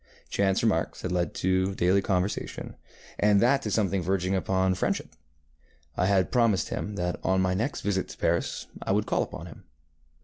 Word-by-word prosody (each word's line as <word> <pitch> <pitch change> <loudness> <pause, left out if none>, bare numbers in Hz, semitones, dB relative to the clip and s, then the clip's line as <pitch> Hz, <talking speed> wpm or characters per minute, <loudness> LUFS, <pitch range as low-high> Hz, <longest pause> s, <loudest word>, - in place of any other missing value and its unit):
Chance 95 -1 +1
remarks - - 0
had 90 - -2
led 90 -1 -1
to 95 +1 +1
daily 95 +2 +3
conversation, 95 +1 -2 0.4
and 105 -1 +4
that 135 +5 +4
to 110 - -3
something 100 -3 +1
verging 95 +1 0
upon 95 0 +1
friendship. 90 - -1 0.9
I 90 - +1
had 95 -2 +2
promised 115 -6 +2
him 105 - -4
that 90 -1 -2
on 95 0 +2
my 95 0 +2
next 115 +9 -2
visit 95 -2 -1
to - - -10
Paris - - 0 0.2
I - - 0
would - - +1
call - - +1
upon 80 - -5
him. 80 - -12
95 Hz, 175 wpm, -27 LUFS, 90-100 Hz, 0.9 s, and